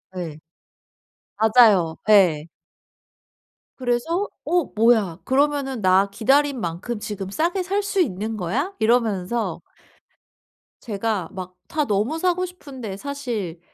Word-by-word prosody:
예. 160 Hz, -4 st, -5 dB, 1.0 s
맞아요. 215 Hz, -7 st, +5 dB
예. 170 Hz, -7 st, +5 dB, 1.3 s
그래서 265 Hz, +10 st, -1 dB, 0.2 s
'어 350 Hz, -2 st, +2 dB
뭐야? 215 Hz, -6 st, +3 dB
그러면은 270 Hz, -3 st, 0 dB
나 190 Hz, +2 st, +4 dB
기다린 270 Hz, +5 st, +2 dB
만큼 195 Hz, +6 st, -4 dB
지금 200 Hz, -3 st, -5 dB
싸게 345 Hz, -, 0 dB
살 400 Hz, +3 st, -1 dB
수 395 Hz, -2 st, +1 dB
있는 220 Hz, -, -2 dB
거야?' 240 Hz, -, -2 dB
이러면서 225 Hz, -2 st, 0 dB, 1.2 s
제가 210 Hz, -5 st, -2 dB
막 185 Hz, -1 st, -8 dB
다 305 Hz, -1 st, 0 dB
너무 215 Hz, +10 st, 0 dB
사고 365 Hz, +1 st, +1 dB
싶은데 265 Hz, -, -8 dB
사실 230 Hz, -10 st, -5 dB
225 Hz, 210 characters per minute, -23 LUFS, 195-280 Hz, 1.3 s, 맞아요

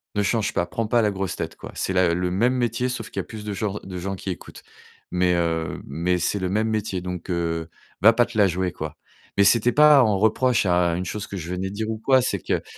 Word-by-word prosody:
ne 105 Hz, -, +1 dB
change 110 Hz, +1 st, 0 dB
pas, 85 Hz, -, +1 dB
prends 115 Hz, +4 st, -3 dB
pas 120 Hz, +1 st, +3 dB
la 105 Hz, -, +2 dB
grosse 95 Hz, -1 st, -3 dB
tête, -, -, -5 dB
quoi! -, -, -10 dB
C'est 95 Hz, -, -2 dB
la 90 Hz, -2 st, +3 dB
le 90 Hz, 0 st, -1 dB
même 115 Hz, +7 st, +2 dB
métier, 125 Hz, 0 st, 0 dB
sauf 120 Hz, -3 st, -5 dB
qu'il -, -, -4 dB
y -, -, +1 dB
a -, -, -11 dB
plus 110 Hz, -2 st, -8 dB
de 105 Hz, -, -3 dB
genr 105 Hz, 0 st, -3 dB
de 95 Hz, -1 st, -6 dB
gens 95 Hz, +2 st, -3 dB
qui 95 Hz, -, -7 dB
écoutent 90 Hz, -, -10 dB, 0.5 s
mais 90 Hz, 0 st, +2 dB
heu, 80 Hz, -2 st, -1 dB
mais 85 Hz, +6 st, -1 dB
c'est 95 Hz, +4 st, -1 dB
le 95 Hz, -1 st, -2 dB
même 110 Hz, +3 st, +1 dB
métier, 105 Hz, -4 st, -2 dB
donc, 90 Hz, -1 st, -6 dB
heu, 85 Hz, -2 st, -2 dB, 0.3 s
va 110 Hz, +4 st, +8 dB
pas 120 Hz, +1 st, +3 dB
te 120 Hz, -, -13 dB
la 100 Hz, -, +6 dB
jouer, 90 Hz, 0 st, -1 dB
quoi!» -, -, -7 dB, 0.4 s
Mais 100 Hz, -, +6 dB
c'était 115 Hz, +4 st, +4 dB
pas 150 Hz, +1 st, +7 dB
un 110 Hz, -5 st, +4 dB
reproche 110 Hz, +3 st, +2 dB
à 90 Hz, -2 st, +2 dB
une 90 Hz, +2 st, -3 dB
chose 105 Hz, +2 st, -5 dB
que 100 Hz, -, -6 dB
je 85 Hz, 0 st, -6 dB
venais 95 Hz, +1 st, -2 dB
dire 110 Hz, +3 st, -4 dB
ou 110 Hz, -, -4 dB
quoi, 130 Hz, +2 st, +4 dB
c'est -, -, -1 dB
que -, -, -2 dB
100 Hz, 265 wpm, -23 LUFS, 90-110 Hz, 0.5 s, va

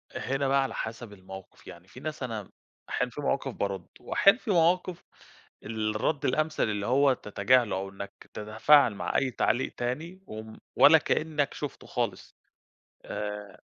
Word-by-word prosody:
هنا 135 Hz, +1 st, -1 dB
بقى 135 Hz, 0 st, +3 dB
على 135 Hz, -, -4 dB
حسب 110 Hz, -1 st, -5 dB
الموقف، 95 Hz, -1 st, -12 dB
يعني 85 Hz, +3 st, -12 dB
في 125 Hz, -, -13 dB
ناس 155 Hz, -1 st, -5 dB
أنا 110 Hz, -5 st, -5 dB, 0.4 s
أحيانًا 125 Hz, -1 st, -1 dB
في 145 Hz, -, -6 dB
مواقف 135 Hz, -2 st, -1 dB
بَاردّ، 95 Hz, -3 st, -3 dB
وأحيانًا 200 Hz, +5 st, +4 dB
في 220 Hz, -, -3 dB
مواقف 175 Hz, +1 st, +2 dB, 0.6 s
الرد 110 Hz, +6 st, -1 dB
الأمثل 155 Hz, +4 st, +1 dB
اللي 105 Hz, -2 st, -1 dB
هو 135 Hz, +1 st, +4 dB
تتجاهله، 105 Hz, 0 st, +2 dB
أو 95 Hz, +1 st, -3 dB
إنك 100 Hz, +1 st, -10 dB
تتفاعل 110 Hz, +3 st, +4 dB
مع -, -, -3 dB
أي 135 Hz, -2 st, +1 dB
تعليق 120 Hz, +2 st, 0 dB
تاني 160 Hz, +10 st, -4 dB
و 110 Hz, 0 st, -7 dB, 0.3 s
ولا -, -, +8 dB
كأنك 155 Hz, -2 st, 0 dB
شُفته 145 Hz, -3 st, -6 dB
خالص، 115 Hz, -6 st, -3 dB, 0.7 s
آآ 105 Hz, -2 st, -6 dB
120 Hz, 150 wpm, -28 LUFS, 105-145 Hz, 0.7 s, ولا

